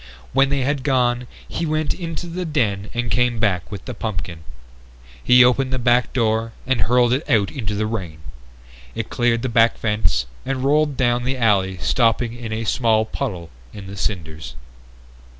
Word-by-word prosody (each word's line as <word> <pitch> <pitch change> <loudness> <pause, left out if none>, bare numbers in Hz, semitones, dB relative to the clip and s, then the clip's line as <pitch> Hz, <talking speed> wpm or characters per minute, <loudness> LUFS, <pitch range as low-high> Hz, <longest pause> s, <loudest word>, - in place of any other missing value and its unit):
When 135 0 +4
they 140 -1 0
had 140 +1 0
gone 125 -2 +1 0.2
he - - -4
went 155 0 0
into 170 -1 -5
the 175 +2 -4
den 105 - -1
and 120 0 -2
came 125 -1 +2
back 100 -5 0
with 100 - -7
the 125 - -5
pumpkin. 90 -7 -5 0.8
He 125 0 +7
opened 130 +1 +2
the 130 - 0
back 120 0 +2
door 115 -2 0
and 130 -3 0
hurled 120 +3 +3
it 140 +4 -2
out 105 -6 +2
into 110 -9 -4
the 110 +1 0
rain. 95 -8 -4 0.8
It - - -4
cleared 120 -1 +1
the - - 0
back 115 -1 +3
fence 95 - 0 0.2
and 130 -1 -3
rolled 145 0 +2
down 120 -1 +1
the 130 +1 -1
alley 100 -5 +2
stopping 115 +3 +1
in 120 -2 -7
a 110 +1 -2
small 110 -1 +2
puddle 95 - -5 0.2
in 100 - -9
the 100 +1 -8
cinders. 80 - -4
120 Hz, 175 wpm, -21 LUFS, 105-130 Hz, 0.8 s, He